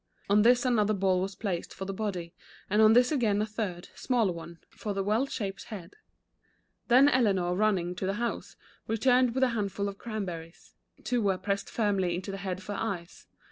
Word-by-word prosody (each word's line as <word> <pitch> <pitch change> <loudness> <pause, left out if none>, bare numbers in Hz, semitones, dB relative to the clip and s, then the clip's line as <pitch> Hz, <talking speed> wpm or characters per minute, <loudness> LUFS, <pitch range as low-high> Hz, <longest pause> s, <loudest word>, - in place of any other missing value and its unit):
On 210 +1 +6
this 245 +3 +4
another 215 -4 +2
ball 190 -1 +2
was 195 +1 -3
placed 180 -5 -4
for 190 - -5
the 195 - -4
body, 185 -5 -4 0.4
and 210 +1 +4
on 215 0 +7
this 245 +3 +5
again 225 -8 +2
a 210 - +1
third, 210 -5 -5
smaller 220 +1 +1
one, 170 0 -8
for 205 -2 -5
the 195 - 0
well 220 +7 +1
shaped 195 -7 -4
2 - - -12
34 215 - -4
The 180 - -10
Lady - - -14
of 430 - -30
Snow. 240 - +4
head. 265 +2 +8
Then 290 - +4 0.2
Eleanor 175 0 0
running 190 -4 +1
to 185 +1 -3
the 195 - 0
house, 235 +2 -3 0.3
re 225 - 0
turned 250 0 +3
with 265 - +2
a 260 - +4
handful 200 -3 -2
of 200 0 -6
cranberries. 180 -7 -6 0.3
Two 245 -2 0
were 195 -3 +1
pressed 200 +2 -2
firmly 195 -5 0
into 190 +3 -5
the 195 - -5
head 190 -1 -4
for 205 - -5
eyes. 195 -5 -5
205 Hz, 220 wpm, -29 LUFS, 185-225 Hz, 0.4 s, head